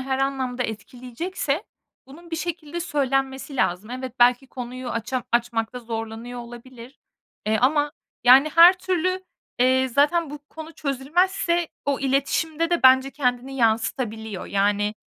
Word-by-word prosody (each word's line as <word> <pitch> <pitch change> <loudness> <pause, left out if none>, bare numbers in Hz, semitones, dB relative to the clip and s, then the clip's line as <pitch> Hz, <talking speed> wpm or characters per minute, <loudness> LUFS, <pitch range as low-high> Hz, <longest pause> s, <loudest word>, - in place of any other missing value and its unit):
her 265 0 -2
anlamda 265 -2 -1
etkileyecekse 255 - -4 0.4
bunun 335 +6 -14
bir 325 - -2
şekilde 340 -1 -4
söylenmesi 270 -3 -1
lazım. 195 -1 0
Evet, 255 0 -5
belki 245 +2 +4
konuyu 255 0 -7
aça 240 +3 -3
açmakta 235 0 0
zorlanıyor 225 +1 -6
olabilir, 240 +2 -12 0.5
eee, 215 0 +2
ama, 290 +3 +2 0.3
yani, 260 +4 +7
her 340 +2 +9
türlü, 370 +1 -1 0.3
eee, 260 +1 +3
zaten 290 +5 +2
bu 295 - -7
konu 320 0 -9
çözülmezse 340 +5 0 0.2
o 280 -1 0
iletişimde 295 +5 0
de 345 - +1
bence 260 +1 +6
kendini 260 -1 -2
yansıtabiliyor. 220 -3 -1
Yani, 205 +1 +1
260 Hz, 125 wpm, -23 LUFS, 240-295 Hz, 0.5 s, her